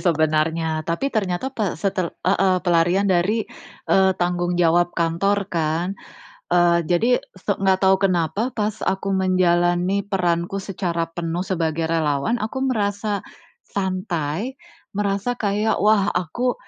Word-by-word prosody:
sebenarnya. 160 -1 +1
Tapi 270 +12 -1
ternyata 210 +4 -1
pe 215 -8 -2
setel 185 0 -1 0.2
heeh, 190 0 +3
pelarian 175 +2 +3
dari, 200 +4 +1 0.4
eee, 190 0 +4
tanggung 175 0 0
jawab 175 0 +2
kantor 185 +5 +1
kan. 165 +3 0 0.6
Eee, 170 -1 +3
jadi 225 +10 +3 0.2
so - - -3
nggak 190 0 +2
tahu 190 0 +5
kenapa, 195 +7 -1
pas 215 0 -2
aku 195 +1 -1
menjalani 185 0 +2
peranku 180 0 -1
secara 175 -3 -2
penuh 170 +1 -3
sebagai 165 -3 -1
relawan, 155 - 0
aku 230 +5 -3
merasa 205 -5 -1 0.5
santai, 185 - -2 0.4
merasa 200 +3 -1
kayak, 210 -2 0
wah 210 -2 +4
aku, 185 +9 -1
185 Hz, 120 wpm, -22 LUFS, 170-200 Hz, 0.6 s, tahu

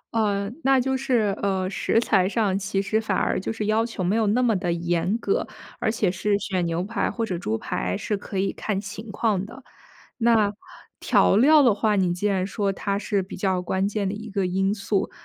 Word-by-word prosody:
嗯， 205 0 0
那 270 -1 +4
就 265 +1 0
是， 235 -7 +1
呃， 190 -2 0
食 225 - +1
材 195 -5 +2
上， 210 -4 +1
其 195 0 -2
实 220 +2 0
反 205 -4 -1
而 - - 0
就 195 - -3
是 220 -2 -3
要 215 +2 +2
求 225 -5 -4
没 190 +5 +1
有 220 -2 +2
那 245 +5 +2
么 225 -4 +3
地 180 -2 -1
严 170 +4 0
格。 410 - -1 0.3
而 220 - +1
且 205 -5 0
是 200 +2 0
选 185 -3 -2
牛 170 +2 -1
排 210 0 -1
或 230 -1 -2
者 180 -5 -3
猪 110 -8 -2
排 90 -3 -3
是 210 - -2
可 200 0 -6
以 195 +1 0
看 200 -3 -2
情 210 +2 -8
况 205 -3 0
的。 255 +5 -11 0.6
那 225 -3 +3 0.5
调 - - +3
料 290 +6 +6
的 240 -5 +5
话， 210 0 +1
你 185 -3 +2
既 205 +4 -1
然 190 -2 0
说 200 -1 -1
它 200 +1 -2
是 205 -2 0
比 185 - -9
较 190 -1 0
关 190 +2 -1
键 205 -1 -2
的 195 - -2
一 215 +2 -7
个 195 -1 -1
因 195 +2 +1
素， 200 -1 -1
200 Hz, 235 characters per minute, -24 LUFS, 190-220 Hz, 0.6 s, 料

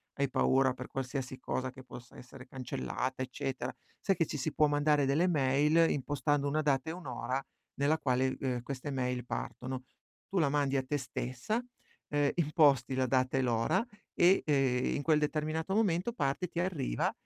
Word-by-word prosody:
hai 140 -1 0
paura 130 -1 +3
per 125 0 -8
qualsiasi 130 -1 -4
cosa 130 0 -2
che 130 0 -12
possa 120 -1 -12
essere 130 +1 -12
cancellata, 130 - -4
eccetera, 130 0 -3 0.3
sai 195 - +2
che 165 - +1
ci 150 - -4
si 140 +3 -2
può 155 - +3
mandare 145 -1 +3
delle 155 +7 +2
mail, 150 +2 +3
impostando 145 +1 0
una 155 +2 0
data 140 +1 +1
e - - -3
un'ora 135 -5 -3 0.3
nella 150 +3 +2
quale, 130 -1 +1
ehm, 125 -3 -2
queste 135 +2 -5
mail 125 -2 -1
partono. 130 0 -4 0.5
Tu 195 - +3
la 145 -4 +3
mandi 140 -1 +1
a 130 - 0
te 145 +3 -1
stessa, 130 - -3 0.5
uhm, 145 -1 +2
imposti 145 -6 +3
la 130 0 +2
data 130 +1 +1
e - - +3
l'ora, 115 - +2 0.3
e, 180 +3 +5
ehm, 135 -4 +2
in 145 - -1
quel 155 -1 +4
determinato 155 +4 -1
momento 200 -1 +2
parte, 140 - -1
ti 170 0 -5
arriva 165 - 0
140 Hz, 175 wpm, -32 LUFS, 130-155 Hz, 0.5 s, e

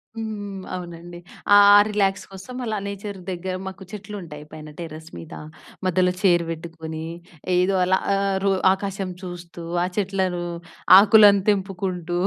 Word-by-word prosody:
హ్మ్. 205 -3 -6
అవునండి. 175 -1 -8 0.4
ఆ - - +9 0.3
రిలాక్స్ 195 -2 0
కోసం 195 +6 -10
అలా 220 -2 -2
నేచర్ 200 0 -6
దగ్గర 185 +1 -4
మాకు 190 0 -8
చెట్లుంటాయి 195 -8 -8
పైన 155 0 -10
టెర్రస్ 160 -1 -8
మీద. 160 - -10 0.5
మధ్యలో 185 0 +2
చైర్ 175 -4 +4
పెట్టుకొని 160 -1 -7 0.5
ఏదో 180 +2 +2
అలా 185 +1 +3 0.2
ఆహ్, 195 0 0
రో 200 - +3 0.2
ఆకాశం 195 -1 -4
చూస్తూ, 175 -2 -9 0.2
ఆ - - +1
చెట్లను, 190 -3 -1 0.6
ఆకులను 205 -1 +7
తెంపుకుంటూ 185 -3 -2
190 Hz, 125 wpm, -23 LUFS, 175-200 Hz, 0.6 s, ఆ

